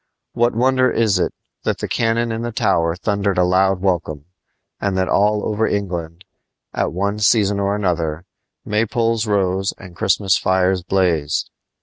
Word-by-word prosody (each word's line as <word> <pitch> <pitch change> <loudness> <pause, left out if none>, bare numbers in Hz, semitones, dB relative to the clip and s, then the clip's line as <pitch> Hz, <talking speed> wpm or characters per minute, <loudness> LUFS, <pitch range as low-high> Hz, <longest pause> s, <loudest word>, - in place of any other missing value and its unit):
What 120 -1 +1
wonder 130 +1 +3
is 110 -6 +1
it - - 0 0.3
that - - -1
the - - -4
cannon 115 0 0
in 115 0 -3
the 120 0 -3
Tower 85 -6 +1
thundered 100 0 -1
a 90 - +4
loud 95 +1 +2
welcome, 85 -6 -1 0.5
and 100 -2 -1
that 95 0 +1
all 105 +1 +2
over 110 +1 0
England, 90 -3 -4 0.5
at - - -1
one 100 +4 -2
season 105 -2 +3
or 100 0 0
another, 85 -4 -2 0.4
maypoles 115 +1 0
rose 95 -1 0
and 90 -3 -12
Christmas 95 +2 +2
fires 95 0 +1
blazed? 85 -5 0
100 Hz, 150 wpm, -19 LUFS, 90-110 Hz, 0.5 s, a